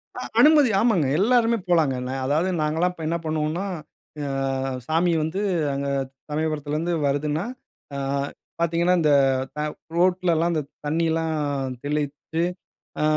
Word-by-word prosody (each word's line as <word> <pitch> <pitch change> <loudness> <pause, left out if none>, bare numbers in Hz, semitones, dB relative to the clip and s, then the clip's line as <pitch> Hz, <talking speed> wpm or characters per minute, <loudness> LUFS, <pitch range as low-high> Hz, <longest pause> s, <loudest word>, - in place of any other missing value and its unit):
அ - - -5 0.2
அனுமதி. 295 -3 +7
ஆமாங்க. 205 - +3
எல்லாருமே 235 +2 +3
போலாங்க. 160 -6 +3
நா 130 - -3
அதாவது 155 +7 +1
நாங்கல்லாம் 165 +4 +1
இப்ப 165 - -9
என்ன 170 +1 0
பண்ணுவோன்னா, 155 +4 -1 0.6
அ 135 -1 -1
சாமி 165 +2 +2
வந்து 170 +6 -2 0.3
அங்க 140 0 -2 0.4
சமயபுரத்திலருந்து 155 +2 -1
வருதுன்னா, 150 +4 0 0.5
ஆ - - -3 0.6
பாத்தீங்கன்னா 170 +2 +2
இந்த 150 -2 +3 0.4
த - - -5 0.4
ரோட்லலாம் 175 -1 +2
அந்த 155 - 0 0.2
தண்ணியெல்லாம் 160 +1 0 0.5
தெளித்து, 150 +3 -2 0.6
அ - - +2
160 Hz, 120 wpm, -24 LUFS, 150-175 Hz, 0.6 s, அனுமதி